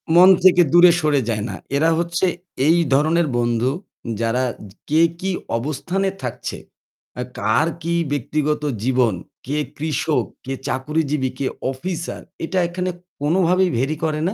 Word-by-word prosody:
মন 180 +2 +9
থেকে 180 -1 +7
দূরে 175 0 +8
সরে 145 -3 +2
যায় 105 -2 -1
না। - - -5 0.2
এরা 160 +3 +3
হচ্ছে 170 +2 0 0.4
এই 165 - +5 0.2
ধরনের 155 +4 +3
বন্ধু 120 +1 +1 0.5
যারা 115 +3 +1 0.5
কে 155 +2 +4 0.2
কি 190 +1 -1 0.3
অবস্থানে 155 +9 -1
থাকছে, 125 - -4 0.6
আ - - -1 0.2
কার 110 +10 +2 0.2
কি 170 +1 -1 0.2
ব্যক্তিগত 150 +2 -1 0.2
জীবন, 125 -3 +2 0.3
কে 145 +4 -2 0.2
কৃষক, 155 0 0 0.2
কে 135 - -3
চাকুরীজীবী, 145 0 -1
কে 135 - 0 0.2
অফিসার 170 +5 -5 0.2
এটা 185 +3 -1
এখানে 180 +1 -2 0.3
কোনোভাবেই 180 +4 +3
ভেরি 135 +5 0
করে 155 -1 -1
না। - - -4
155 Hz, 140 wpm, -21 LUFS, 130-170 Hz, 0.6 s, মন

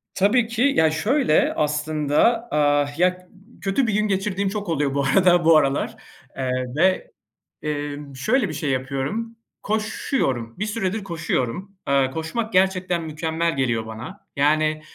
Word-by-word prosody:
Tabii 220 +4 +3
ki. 230 0 -3
Ya, 160 -1 +4
şöyle 210 - +2
aslında, 150 +9 +1
aaa, 145 -1 +3
ya, 180 - +5
ııı, 190 +5 -22
kötü 205 +5 +1
bir 220 - 0
gün 215 +1 +1
geçirdiğim 195 0 -1
çok 205 -1 -4
oluyor 145 -4 0
bu 140 0 0
arada 175 +3 +4
bu 165 -1 +7
aralar, 140 -2 0 0.4
eee, 130 -1 -2 0.3
ve, 185 +3 +2 0.5
eee, 145 -1 -3 0.2
şöyle 215 - +1
bir - - -5
şey 145 -1 -2
yapıyorum, 135 - -2 0.3
koşuyorum, 210 - -1
bir 210 - 0
süredir 210 -1 -2
koşuyorum. 170 0 -2 0.2
Eee, 135 -1 +2
koşmak 220 - -3
gerçekten 185 -2 +2
mükemmel 160 +1 -2
geliyor 115 -4 0
bana. 120 - -9
Yani, 155 +2 +2
165 Hz, 145 wpm, -23 LUFS, 145-205 Hz, 0.5 s, bu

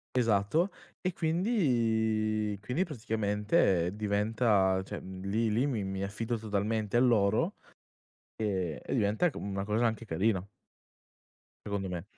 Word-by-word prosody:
Esatto. 115 - +2 0.3
E 185 - 0
quindi 115 - +1
quindi 125 - 0
praticamente 105 - +1
diventa 105 -2 +2
cioè, - - -6
mhmm, 95 0 -8
lì 110 +3 +1
lì 115 +6 +2
mi 120 -8 -1
mi 95 0 -3
affido 115 +4 -2
totalmente 105 +1 -1
a - - +6
loro, 120 - +3 0.8
e 95 -7 -2
e - - -4
diventa 110 - +2
co - - -8
mhmm, 100 - -5
una 100 0 -2
cosa 110 +3 +1
anche 115 0 -1
carina 95 +1 0 1.2
secondo 100 -2 -2
me. 90 -2 -4
110 Hz, 135 wpm, -30 LUFS, 100-120 Hz, 1.2 s, a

